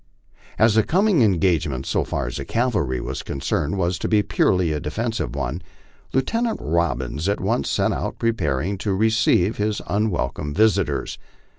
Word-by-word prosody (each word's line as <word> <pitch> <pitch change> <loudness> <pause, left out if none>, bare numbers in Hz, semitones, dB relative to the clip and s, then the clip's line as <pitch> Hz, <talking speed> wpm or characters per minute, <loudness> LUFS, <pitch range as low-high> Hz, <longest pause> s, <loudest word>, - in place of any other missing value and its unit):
As 110 0 +4
the 110 - +5
coming 190 - +2
engagement, 85 - +1
so - - 0
far 70 - -3
as - - -4
the 70 - -4
cavalry 105 - 0
was - - -4
concerned, 70 +5 -2
was 90 -1 0
to - - -2
be 105 -2 +3
purely 90 -5 +2
a 75 - -1
defensive 110 - -3
one, 70 +9 -3 0.5
Lieutenant 225 - 0
Robbins 80 -1 -1
at 100 - 0
once - - 0
set - - +1
about - - -3
preparing 95 - -1
to 100 -1 -1
re 110 +4 +2
ceive 110 -2 +2
his 105 0 -1
unwelcome 85 - -1
visitors. 100 -8 +1
95 Hz, 160 wpm, -22 LUFS, 75-110 Hz, 0.5 s, the